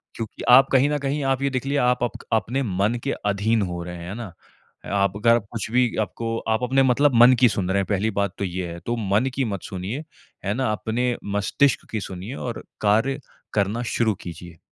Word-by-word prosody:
क्योंकि 115 -2 -6
आप 135 +2 +8
कहीं 135 +2 +4
न 150 - +1
कहीं 140 +1 -2
आप 135 -1 +1
ये 140 - +1
देख 130 -1 -3
लीजिए 140 +1 0
आप 125 -1 +2
आपक 120 - -4
अपने 115 +6 +1
मन 100 +1 0
के 140 - -1
अधीन 105 +2 +1
हो 90 -2 -4
रहे 90 0 -7
हैं, 85 +1 -8
है 100 - -5
ना? 115 -5 -7 0.6
आप 100 -1 +1
अगर 115 +2 +4
कुछ 115 -3 -4
भी 125 -1 +2
आपको 115 +2 -3
आप 110 +2 +1
अपने 135 +2 +3
मतलब 130 +1 +3
मन 125 +1 +8
की 125 - +7
सुन 95 -3 -2
रहे 95 - +1
हैं, 100 - 0
पहली 105 +2 0
बात 100 -3 -1
तो - - -1
ये 90 0 -3
है, 85 - -7
तो 120 - -1 0.2
मन 110 +5 +3
की 135 - 0
मत 100 -5 -4
सुनिए। 100 - -5 0.4
है 100 - +1
ना? 130 -1 0
अपने 120 +3 -1 0.2
मस्तिष्क 110 +4 +1
की 110 - -1
सुनिए 95 +7 -6
और 120 -4 -5 0.2
कार्य 115 +7 +2 0.3
करना 105 +3 0
शुरू 110 -2 +2
कीजिए। 85 -1 -9
115 Hz, 220 wpm, -23 LUFS, 100-125 Hz, 0.6 s, आप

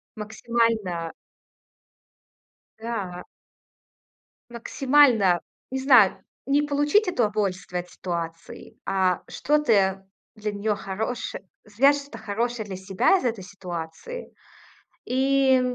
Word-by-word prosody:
Максимально. 220 -5 -1 1.6
Да. 205 -6 -5 1.3
Максимально. 235 - +3 0.3
Не 265 - -2
знаю, 245 -8 +5 0.2
не 280 +2 +3
получить 295 +8 +2
удовольствие 205 - -1
от 180 - -17
ситуации, 165 -2 -6
а 190 -2 +1
что 300 +1 +1
ты 195 -9 +2 0.3
для 215 0 -3
неё 205 +1 -1
хорош 205 +5 -4 0.3
свяжешь 275 +7 +4
что-то 280 +1 -11
хорошее 220 +2 -2
для 195 -2 -6
себя 190 - +2
из 310 - -4
этой 225 -6 -1
ситуации. 180 - -7 0.7
И 265 0 +3
215 Hz, 95 wpm, -25 LUFS, 190-265 Hz, 1.6 s, знаю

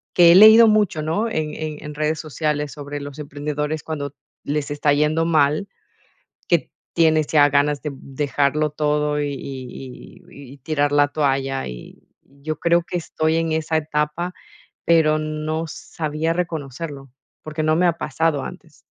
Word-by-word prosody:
que 170 -1 +8
he - - +7
leído 220 +3 +9
mucho, 210 -7 +2
¿no?, 165 +9 -1
en 155 -7 -3
en 155 -1 -5
en 150 0 -7
redes 155 +1 -1
sociales 150 -1 -2
sobre 145 0 -7
los 145 0 -8
emprendedores, 150 +1 -4
cuando 145 -3 -5 0.3
les 145 0 -2
está 145 0 +2
yendo 150 +3 +1
mal, 155 +3 +2 0.8
que - - +1 0.2
tienes 160 -2 +3
ya 145 -2 +5
ganas 145 +1 +1
de 150 - -3
dejarlo 145 +2 -1
todo, 150 0 0
y 145 - -1
y 130 -1 -9
y 140 -2 -13
y - - -14
tirar 145 +1 0
la 145 0 +4
toalla, 135 -2 -1
y - - -11
yo 140 +3 -7
creo 170 0 +3
que 175 - -4
estoy 160 -1 -1
en 165 -1 0
esa 160 0 0
etapa, 155 +3 -2 0.5
pero 155 -2 +4
no 155 +1 -3
sabía 155 +1 -3
reconocerlo 150 -4 -5 0.3
porque 155 0 -4
no 155 0 +2
me 180 +1 +3
ha 170 -1 0
pasado 155 -1 -1
antes. - - -10
150 Hz, 160 wpm, -21 LUFS, 145-160 Hz, 0.8 s, leído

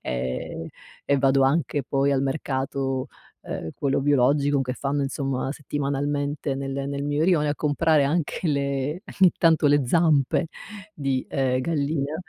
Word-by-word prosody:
e 65 +5 -4 0.3
e 140 -1 +2
vado 135 0 +3
anche 145 0 +1
poi 140 +1 +1
al 135 - +1
mercato, 135 -1 -2 0.4
uhm, 80 - -5
quello 140 -1 0
biologico 140 +1 +3
che 125 - -3
fanno 140 +1 -1
insomma 135 -1 -2
settimanalmente 145 0 -2
nel 135 0 -4 0.2
nel 140 0 -3
mio 145 +2 0
rione, 160 -5 +3
a 145 - 0
comprare 150 0 +2
anche 165 +3 -1
le 140 +3 -1 0.2
ogni 185 -2 +7
tanto 160 -3 +4
le 145 -2 +3
zampe 155 0 +2 0.5
di, 135 -5 -2
uhm, 130 -1 +1
gallina 145 -1 -1
140 Hz, 140 wpm, -24 LUFS, 135-150 Hz, 0.5 s, ogni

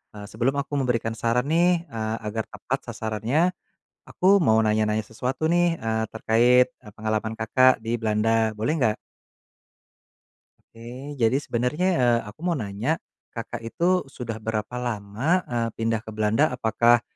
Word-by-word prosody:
eee, 105 - -8
sebelum 125 +5 0
aku 145 +1 -5
memberikan 115 -3 0
saran 120 +3 +1
nih, 170 +1 +3
eee, 110 -3 -3
agar 110 +1 -2
tepat - - -3
sasarannya, 115 - 0 0.6
aku 195 +2 +4
mau 110 -4 +4
nanya-nanya 110 0 +1
sesuatu 125 +7 -3
nih, 175 0 +2
eee, 110 0 -1
terkait, 120 +3 +4
eee, 105 - -15
pengalaman 110 +1 -2
Kakak 130 +4 +4
di 115 +1 -1
Belanda, 110 0 +1
boleh 115 +8 0
nggak? 110 -7 +1 1.7
Oke 125 +5 -9
jadi 115 +3 +3
sebenernya, 125 +10 0
eee, 120 -2 +4
aku 105 - -15
mau 175 - +1
nanya, 110 +6 -1 0.4
Kakak 115 0 -6
itu 180 +7 +1
sudah 115 -4 -6
berapa 110 +1 -3
lama, 120 - -1
eee, 120 -1 -1
pindah 115 0 0
ke - - -8
Belanda, 110 +7 +2
apakah 120 0 +3
115 Hz, 145 wpm, -25 LUFS, 110-135 Hz, 1.7 s, aku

